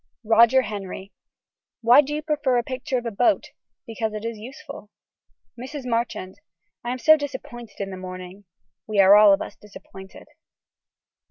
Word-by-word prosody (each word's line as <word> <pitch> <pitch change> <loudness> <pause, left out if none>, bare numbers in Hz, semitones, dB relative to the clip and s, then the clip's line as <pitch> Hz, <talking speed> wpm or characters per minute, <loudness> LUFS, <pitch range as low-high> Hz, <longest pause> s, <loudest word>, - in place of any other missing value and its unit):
(Roger 235 +4 +5
Henry.) 195 -2 -7 0.7
Why 240 +5 +7
do 295 +1 -5
you 305 - -4
prefer 290 -5 0
a 240 - 0
picture 260 +1 -3
of 245 - -5
a 230 - -3
boat. 245 +9 +1 0.3
Because 225 -1 -4
it 215 +1 -6
is 230 -2 -5
useful. 275 0 -11 0.7
(Mrs. 260 +3 -8
Marchand.) 230 -5 -3 0.4
I 240 - -4
am 255 - -3
so 315 +5 +6
disappointed 260 -6 -8
in 195 -1 -4
the 190 - -7
morning. 185 +1 -9 0.4
We 215 -2 -1
are 195 +1 +8
all 210 -1 +7
of 195 - +2
us - - -10
disappointed. 190 -2 -14
230 Hz, 160 wpm, -23 LUFS, 200-260 Hz, 0.7 s, are